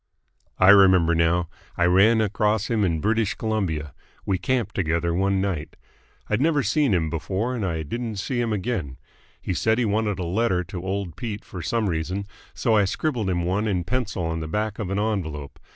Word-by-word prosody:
"I 95 - +5
remember 95 -4 +6
now. 85 +1 +2 0.3
I 85 - +3
ran 100 +6 +5
across 105 +1 0
him 110 -3 +2
in 85 -5 0
British 110 -1 +1
Columbia. 85 - -2 0.3
We 95 -2 0
camped 120 +5 -1
together 85 -1 0
one 95 +2 +1
night. 95 -6 -3 0.5
I'd 105 +3 0
never 150 -2 +2
seen 140 +5 +2
him 80 -5 +1
before 95 +9 -2
and 120 -4 -3
I 85 -4 -2
didn't 115 +7 -4
see 120 +5 -2
him 115 -2 -1
again. 95 - -2 0.4
He - - -3
said 110 +5 +1
he 125 - +1
wanted 105 -1 0
a 90 - -3
letter 90 +1 +1
to 90 0 -7
old 95 -3 -3
Pete 110 -4 -5
for 90 - -7
some 115 +4 0
reason, 90 +3 -2 0.3
so 115 - +2
I 105 -2 +4
scribbled 115 0 -1
him 90 -2 0
one 100 +5 0
in 90 -4 0
pencil 110 -3 -2
on 80 0 -2
the 80 - -4
back 105 +5 -2
of 105 -5 -3
an 100 - -1
envelope. 85 -10 -3
100 Hz, 195 wpm, -24 LUFS, 85-110 Hz, 0.5 s, remember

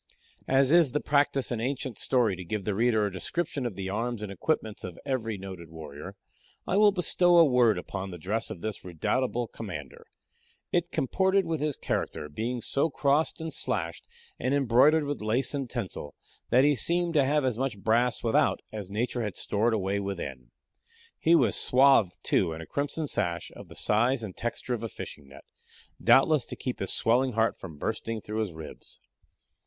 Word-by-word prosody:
As 135 0 +3
it 170 - +8
is 155 -7 +2
the 150 - +2
practice 140 -3 +1
in 115 -2 -2
ancient 130 -1 -3
story 120 -7 +2
to 90 - -7
give 100 +2 -4
the 105 - 0
reader 110 0 +2
a 100 - -2
description 130 - -2
of 110 - -7
the 95 0 -4
arms 115 +1 -2
and 105 - -5
equipments 110 - -2
of 90 -2 -7
every 115 -6 -2
noted 95 -4 -9
warrior, 75 -2 -9 0.5
I - - -1
will 210 0 +6
bestow 175 -1 +3
a 165 - +8
word 125 -6 +4
upon 95 +2 -5
the 90 - -7
dress 100 +7 -2
of 85 - -7
this 110 -2 -4
redoubtable 120 +8 -1
commander. 85 -11 -8 0.6
It 175 0 +1
comported 190 +6 +1
with 160 -3 -2
his 150 -2 -1
character, 75 - -3
being 115 +9 -3
so 140 +4 +1
crossed 145 +2 +1
and 160 -1 -5
slashed, 85 -10 -3 0.3
and 130 +3 +1
embroidered 140 +4 +4
with 145 -3 -3
lace 120 +6 0
and 135 -3 -3
tinsel, 100 - -5 0.3
that 130 - +5
he 145 0 +4
seemed 170 +7 0
to 145 -3 +4
have 145 +1 +2
as 125 -3 -1
much 135 -5 -1
brass 115 +4 +1
without 115 -2 +2
as 105 -3 -6
nature 120 +4 -2
had 105 -4 -3
stored 110 +3 +1
away 100 -1 -1
within. 70 -11 -5 0.7
He 165 +1 +5
was 125 - +3
swathed, 125 -8 +4
too, 85 -3 +2
in 80 - -7
a - - -8
crimson 145 - -2
sash, 85 - -2
of - - -11
the - - -12
size 120 +4 +1
and 100 -4 -6
texture 120 +1 -3
of 115 -1 -3
a 115 - -3
fishing 75 -8 -9
net 70 0 -14 0.6
doubtless 145 -1 +5
to - - -6
keep 125 - -4
his 95 - -2
swelling 125 +3 +2
heart 115 +1 +2
from 80 -6 -10
bursting 110 +5 -3
through 105 +1 -5
his 110 -4 -1
ribs. 80 -1 -11
115 Hz, 190 wpm, -28 LUFS, 100-140 Hz, 0.7 s, it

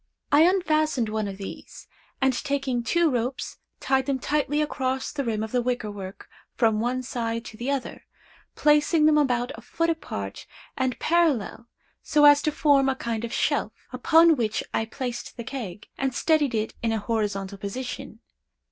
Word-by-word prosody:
I 310 +4 +7
unfastened 310 - +1
one 215 -1 -1
of 195 -1 -6
these, 195 - -9 0.3
and 265 -1 +3
taking 275 -4 -1
two 330 +7 +2
ropes 250 +1 -3 0.2
tied 265 0 +1
them 275 -1 +1
tightly 295 +2 0
across 265 -3 -1
the 280 - -3
rim 220 -3 -1
of 220 - -5
the 250 - +1
wicker 245 -3 -2
work 195 -1 -9 0.3
from 220 -3 +2
one 250 +3 -1
side 230 -2 -3
to - - -9
the 245 +4 -3
other; 280 -2 -3 0.5
placing 300 +1 +4
them 310 0 +5
about 250 -3 +1
a - - -11
foot 330 0 0
apart 100 - -6 0.3
and 260 -2 -1
parallel 295 - +1 0.3
so 295 -1 +3
as 290 0 +8
to 305 - 0
form 285 -3 +3
a 265 - 0
kind 230 -3 -3
of 235 - -4
shelf, - - 0 0.2
upon 330 0 +5
which 220 -2 -1
I 225 - 0
placed 240 +1 -6
the 235 - -5
keg, 215 -7 -6
and 270 -2 -1
steadied 300 -5 +2
it 215 0 -1
in 230 - 0
a 225 - +1
horizontal 200 -2 -2
position. 245 +6 -6
255 Hz, 175 wpm, -25 LUFS, 225-290 Hz, 0.5 s, as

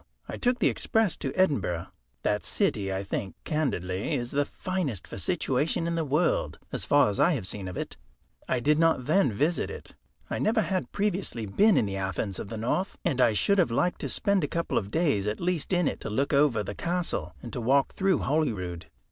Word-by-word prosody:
I - - -5
took 245 0 +1
the - - +3
express 220 -5 +1
to 135 - -3
Edinburgh. 110 - +1 0.4
That 105 0 0
city, 105 - +1
I 95 +1 -2
think 95 -1 -4
candidly, 100 - -1
is 120 0 -3
the 145 +1 +1
finest 170 - -3
for - - -7
situation 155 - 0
in 170 - -1
the 165 -1 0
world, 150 +4 +1
as - - -3
far 145 -5 +5
as 100 - -5
I 175 - +5
have 120 -11 -3
seen 95 0 -4
of 90 - -6
it. - - -5 0.5
I 130 - +2
did 150 +5 +2
not 165 -6 +3
then 155 -3 +3
visit 150 +11 0
it. - - -9 0.3
I - - -3
never 220 +1 +2
had 190 -3 -2
previously 195 - -1
been 200 - +4
in - - +3
the 100 -1 -3
Athens 95 0 -2
of - - -5
the 115 - -5
North, 125 - -1
and 130 -2 +1
I 115 -3 +5
should 200 - +2
have 175 - +4
liked 175 +10 0
to - - -3
spend 200 -3 +1
a - - +1
couple 170 +3 -2
of 100 - -7
days 140 - +1
at 105 - -2
least 175 -2 -1
in 180 -4 +2
it, - - -2
to - - -5
look 135 +8 0
over 140 -7 +3
the 100 - -5
castle 175 - -2
and 120 - -8
to 125 - -3
walk 135 +4 +2
through 190 -4 +1
Holyrood. 100 - -1
140 Hz, 215 wpm, -28 LUFS, -, 0.5 s, far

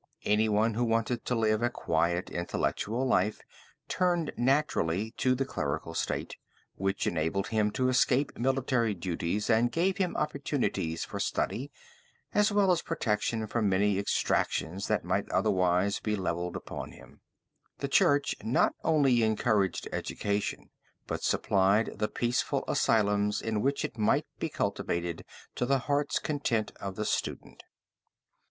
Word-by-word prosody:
Anyone 110 +1 +2
who 120 +3 0
wanted 115 +1 0
to 125 - 0
live 110 -1 +2
a 120 - +2
quiet, 85 -5 0
intellectual 110 +7 -1
life 105 -4 +1 0.5
turned 175 -3 +1
naturally 115 - +1
to 130 0 +2
the 135 +1 -1
clerical 80 - -3
state, - - -3 0.4
which 95 +1 -1
enabled 85 +4 -1
him 110 -2 +2
to 130 - +1
escape 130 +2 +2
military 125 -3 +1
duties 90 +3 -2
and 120 +1 +3
gave 180 +7 +1
him 185 -3 -1
opportunities 140 - -1
for - - -6
study, 135 +5 -2 0.6
as 210 +1 +3
well 200 -2 +4
as 175 - +2
protection 110 -6 -1
from 110 -1 0
many 100 +1 +2
exactions 95 -2 0
that - - 0
might - - -1
otherwise 90 +2 +2
be 105 -1 -1
levied 90 -2 -2
upon 95 - -6
him. - - -16 0.6
The 140 - -3
church 140 +1 +3
not 115 +3 +2
only 140 -7 +3
encouraged 105 -3 +1
education, 100 0 -3 0.3
but - - -4
supplied 100 +2 +2
the 105 - +1
peaceful 120 +2 -1
asylums 105 -2 +2
in 110 -2 -1
which 140 +4 0
it 115 - -7
might 105 - +2
be - - -2
cultivated 85 -1 -2 0.3
to 125 - 0
the 135 +1 +3
heart's 145 +2 0
content 130 -8 -1
of 100 -1 -5
the 105 - -3
student. - - -3
110 Hz, 140 wpm, -29 LUFS, 100-130 Hz, 0.6 s, well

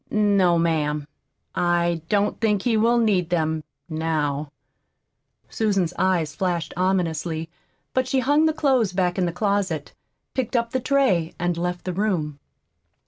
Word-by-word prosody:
"No, 200 -5 +3
ma'am, 150 -3 0 0.5
I 175 -1 +1
don't 205 0 +1
think 210 -3 +2
he 240 -2 +2
will 230 +2 +3
need 200 -7 +2
them 160 -2 0 0.2
now." 155 -3 -2 1.0
Susan's 195 -6 0
eyes 175 -5 +1
flashed 175 -3 -1
ominously. 165 -3 -1 0.4
But 260 -1 +1
she 260 0 +1
hung 290 +5 +3
the - - +3
clothes 260 - +2
back 180 0 0
in 180 - +2
the - - -1
closet, 190 -5 -1 0.4
picked 260 -2 -2
up 235 -1 +1
the 260 - 0
tray, 245 -11 +1
and 175 0 0
left 175 +1 -3
the 185 - -2
room. 170 -7 -1
180 Hz, 140 wpm, -23 LUFS, 165-215 Hz, 1.0 s, No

